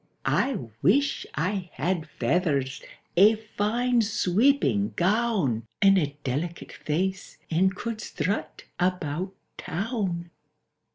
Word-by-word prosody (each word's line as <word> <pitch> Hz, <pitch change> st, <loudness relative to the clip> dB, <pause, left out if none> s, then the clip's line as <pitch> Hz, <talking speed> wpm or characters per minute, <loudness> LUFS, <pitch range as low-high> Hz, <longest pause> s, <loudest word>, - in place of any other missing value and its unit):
—"I 270 Hz, -5 st, +2 dB, 0.2 s
wish 275 Hz, -, +2 dB
I 180 Hz, +4 st, -1 dB
had 175 Hz, -1 st, -1 dB
feathers, 140 Hz, -7 st, 0 dB, 0.3 s
a 210 Hz, +5 st, +7 dB
fine 225 Hz, +3 st, 0 dB
sweeping 185 Hz, -, +2 dB
gown, 185 Hz, -, +1 dB
And 195 Hz, 0 st, +6 dB
a 145 Hz, -3 st, -2 dB
delicate 155 Hz, +7 st, -3 dB
face, 190 Hz, +5 st, -2 dB
and 190 Hz, +4 st, +3 dB
could 230 Hz, +1 st, -4 dB
strut 165 Hz, -3 st, -3 dB, 0.2 s
about 180 Hz, 0 st, -1 dB, 0.2 s
Town!" 180 Hz, -3 st, -3 dB
185 Hz, 100 wpm, -26 LUFS, 155-215 Hz, 0.3 s, a